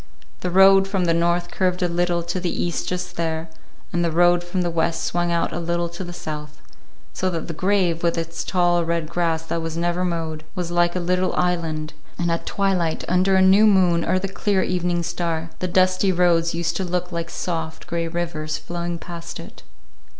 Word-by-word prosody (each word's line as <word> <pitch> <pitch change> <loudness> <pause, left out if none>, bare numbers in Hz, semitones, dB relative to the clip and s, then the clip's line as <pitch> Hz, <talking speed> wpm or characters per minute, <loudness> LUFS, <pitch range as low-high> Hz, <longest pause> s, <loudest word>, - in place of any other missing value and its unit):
The 180 - -2
road 195 +1 +6
from 195 -2 0
the 165 - +3
north 170 +1 +1
curved 180 -1 0
a - - +3
little 175 0 0
to 170 +2 -3
the 180 -1 -1
east 175 0 -2
just 180 0 -4
there, 160 -1 -2 0.4
and 175 0 +1
the 170 - +2
road 175 +1 +4
from 180 +1 -2
the 175 - -1
west 165 0 0
swung 175 0 0
out 170 0 0
a - - -2
little 170 0 -1
to 170 +2 -6
the 175 - -7
south; 150 -3 -7 0.5
so 185 - -1
that 165 -3 -4
the 170 - -4
grave, 180 -1 +1
with 170 0 +1
its 165 0 -3
tall 175 -2 +2
red 165 -1 -1
grass 165 -1 0
that 165 0 -3
was 165 0 -4
never 175 +1 0
mowed, 165 -3 -2
was 175 -2 -3
like 175 0 +2
a - - +1
little 180 +1 0
island; 165 -3 -1 0.2
and 170 -1 0
at 165 - -2
twilight, 185 -5 0
under 185 +2 +3
a 190 - +5
new 195 +3 +6
moon 180 -4 +4
or 185 - +1
the 190 +1 -2
clear 195 0 0
evening 175 -1 0
star, 170 -1 -2
the 185 - -1
dusty 185 +1 +3
roads 170 -2 +2
used 170 0 -1
to 190 - -1
look 180 0 -2
like 170 0 -3
soft 160 -3 -4
gray 170 -1 -2
rivers 165 -3 -3
flowing 175 0 -4
past 170 0 -8
it. - - -11
175 Hz, 205 wpm, -22 LUFS, 165-180 Hz, 0.5 s, road